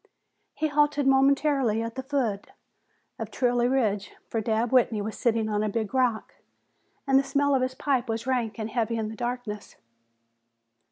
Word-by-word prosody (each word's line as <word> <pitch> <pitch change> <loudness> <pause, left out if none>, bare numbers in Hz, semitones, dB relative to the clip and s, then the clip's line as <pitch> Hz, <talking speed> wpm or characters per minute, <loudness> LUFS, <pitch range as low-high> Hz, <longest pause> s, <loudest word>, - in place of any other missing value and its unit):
He 310 - 0
halted 295 -1 +2
momentarily 270 -4 +3
at 230 0 -5
the 260 - -4
foot 255 -7 -2 0.7
of - - -4
Trilley 245 -1 +1
Ridge, 210 -7 0
for 225 - -2
Dabb 225 +2 0
Whitney 240 -4 +3
was 210 +1 -4
sitting 225 -2 +1
on 210 -1 0
a 215 - 0
big 220 +2 -3
rock 250 -4 0 0.7
and 270 -1 +4
the - - +1
smell 285 +1 +1
of 265 - +2
his 255 0 -1
pipe 260 -4 0
was 225 +1 -2
rank 240 -5 -1
and 220 0 -4
heavy 230 0 -1
in 220 -1 -2
the 220 - -7
darkness. 240 -3 -5
240 Hz, 170 wpm, -26 LUFS, 220-270 Hz, 0.7 s, and